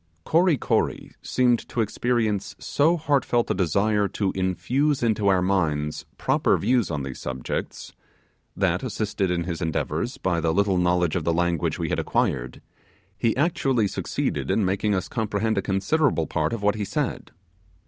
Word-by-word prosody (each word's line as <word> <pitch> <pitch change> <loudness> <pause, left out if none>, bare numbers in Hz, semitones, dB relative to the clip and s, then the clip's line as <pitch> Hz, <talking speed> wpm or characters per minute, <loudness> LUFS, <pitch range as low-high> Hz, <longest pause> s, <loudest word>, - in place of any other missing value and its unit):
Kory 170 -1 +3
Kory - - -1
seemed 125 -2 +1
to - - -4
experience 110 -2 0
so 160 +4 +2
heartfelt 140 -6 +1
a - - +3
desire 100 +4 +1
to 100 -1 -1
infuse 125 +10 0
into 110 -3 +1
our 95 -2 +3
minds 75 -6 -1
proper - - +2
views 120 -1 +1
on 75 -4 -3
these 65 -1 -6
subjects, 65 -1 -5 0.6
that, - - +1
assisted 100 -3 -2
in 85 -1 0
his 85 0 -4
endeavours 90 - -2
by 90 -3 0
the 80 0 +1
little 100 -2 +2
knowledge 90 -2 +2
of 90 - -1
the 85 - +1
language 85 -2 0
we - - -2
had - - 0
acquired, 60 +1 -1 0.5
he 115 +2 0
actually 135 - +1
made 100 -1 -1
us 90 - -3
comprehend 110 -1 -1
a - - 0
considerable 95 - +1
part 80 -1 -1
of 115 -3 -4
what 105 0 +3
he 105 -1 -3
said. - - -3
100 Hz, 155 wpm, -24 LUFS, 90-120 Hz, 0.6 s, Kory